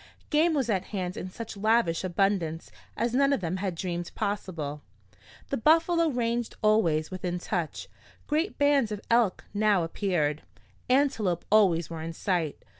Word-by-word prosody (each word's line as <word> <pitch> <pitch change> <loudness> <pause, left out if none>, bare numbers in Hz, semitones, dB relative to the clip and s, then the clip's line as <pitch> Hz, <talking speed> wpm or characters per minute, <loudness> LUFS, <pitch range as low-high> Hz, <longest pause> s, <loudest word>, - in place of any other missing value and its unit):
Game 315 +2 +3
was 270 -5 0
at 190 -4 0
hand 185 -3 -4
in 185 - -5
such 225 +4 -7
lavish 210 -5 +2
abundance 180 -3 0 0.3
as 235 0 0
none 275 +2 +3
of 280 - +2
them 180 0 -2
had 190 -2 -3
dreamed 175 0 -4
possible. 165 -8 -3 0.7
The 275 - -1
buffalo 330 +5 +4
ranged 240 -3 -1
always 175 -8 +2
within 180 -1 -3
touch, 175 -2 -3 0.4
great 315 +6 -1
bands 285 -6 +3
of 210 - -3
elk 230 -5 +3
now 205 -3 +3
appeared, 165 -4 -1 0.5
antelope 250 -10 +1
always 180 -7 +4
were 165 -1 -5
in 165 +1 -5
sight. 170 -4 -2
200 Hz, 150 wpm, -28 LUFS, 175-235 Hz, 0.7 s, buffalo